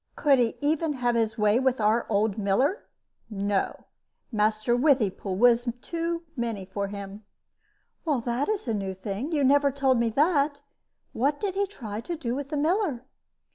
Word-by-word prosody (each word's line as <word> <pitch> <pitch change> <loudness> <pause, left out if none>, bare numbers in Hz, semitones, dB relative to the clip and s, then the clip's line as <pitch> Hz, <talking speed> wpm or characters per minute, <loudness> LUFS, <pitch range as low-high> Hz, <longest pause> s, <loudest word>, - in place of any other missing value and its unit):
Could 280 -3 +3
he 235 -2 +1
even 305 +1 +1
have 245 -3 0
his 225 -1 0
way 210 +2 +3
with 260 -1 +1
our 220 +2 +2
old 210 -1 +1
miller? 255 - +1 0.4
No; 200 -2 -1 0.5
Master 215 +1 +1
Withypool 240 -8 +1
was 240 +2 +4
too 335 +3 -3
many 230 -6 -3
for 200 +1 -3
him." 200 +1 -8 0.8
"That 250 - 0
is 425 -9 -2
a 230 - 0
new 195 -2 -3
thing. 205 - -4
You 295 -3 +1
never 280 +1 +4
told 265 -2 +2
me 235 -1 +2
that. 285 +2 +2 0.5
What 285 +4 0
did 400 -3 -2
he 400 +1 0
try 220 - -6
to 340 +6 -5
do 240 -6 -3
with 275 +1 -4
the 300 - -2
miller?" 310 - 0
245 Hz, 165 wpm, -26 LUFS, 215-290 Hz, 0.8 s, was